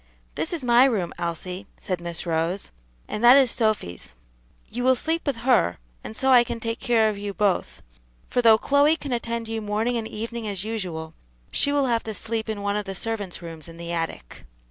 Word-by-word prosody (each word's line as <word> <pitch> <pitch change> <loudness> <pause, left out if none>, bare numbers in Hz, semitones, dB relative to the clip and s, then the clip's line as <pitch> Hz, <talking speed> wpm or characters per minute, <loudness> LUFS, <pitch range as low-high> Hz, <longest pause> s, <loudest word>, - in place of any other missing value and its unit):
"This - - -1
is 335 -6 -1
my 240 +1 +6
room, 205 -10 0
Elsie," 180 +3 -4
said 185 -4 -3
Miss 170 0 -4
Rose, 170 +3 -1 0.4
"and 210 - -4
that 245 +3 +9
is 265 -4 +4
Sophy's. 215 - -1 0.5
You 245 +2 -4
will 260 0 +5
sleep 320 +5 -1
with 280 - +1
her, 225 - +3 0.3
and 220 - -7
so 265 +3 +2
I 245 -2 +8
can 235 - -5
take 230 0 -3
care 225 -2 +3
of 200 - -7
you 200 -1 -5
both, 205 -3 0 0.4
for 245 - +1
though 225 -2 +7
Chloe 285 +6 +4
can 280 -5 -4
attend 235 -1 -2
you 225 0 -3
morning 215 +3 0
and 225 -1 -3
evening 230 +1 -5
as 200 -2 -3
usual, 180 -8 -4 0.4
she 285 - +1
will 285 -1 +2
have 235 -3 +1
to 220 -1 -4
sleep 225 0 -3
in 205 -2 -3
one 200 0 0
of 210 - -3
the 195 -1 -5
servants' 205 -4 -4
rooms 165 -2 -9
in 165 0 -11
the 170 0 -5
attic." 165 - -4
220 Hz, 210 wpm, -24 LUFS, 185-240 Hz, 0.5 s, that